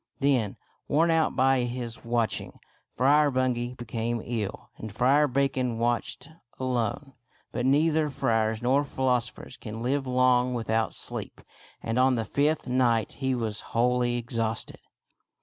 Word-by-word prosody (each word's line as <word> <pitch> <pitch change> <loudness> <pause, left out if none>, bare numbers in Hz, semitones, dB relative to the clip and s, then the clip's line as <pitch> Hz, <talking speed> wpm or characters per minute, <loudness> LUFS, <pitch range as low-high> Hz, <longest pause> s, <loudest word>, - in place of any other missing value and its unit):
Then, 130 -8 +1 0.3
worn 165 +3 +3
out 165 -1 +2
by 135 0 +3
his 120 -1 -4
watching, 115 -1 -2 0.4
Friar 145 +4 +4
Bungay 125 -2 -1
be 120 - -8
came 115 +1 -2
ill 110 -5 -4
and 110 - -7
Friar 135 +7 +3
Bacon 130 -3 0
watched 120 +1 -1 0.3
alone. 130 +2 -2 0.4
But 125 +2 -1
neither 155 +2 +3
friars 110 -3 0
nor 135 +4 +3
philosophers 125 -2 -2
can 110 0 -7
live 135 +2 0
long 125 0 +3
without 115 -1 -1
sleep, - - -5 0.4
and 115 +2 -1
on 130 0 +4
the 115 -2 -2
fifth 150 +5 0
night 125 -3 +1
he 130 -1 -1
was 110 -3 -2 0.2
wholly 120 0 +2
ex 120 0 -5
hausted. 115 -1 -2
125 Hz, 140 wpm, -27 LUFS, 115-135 Hz, 0.4 s, Friar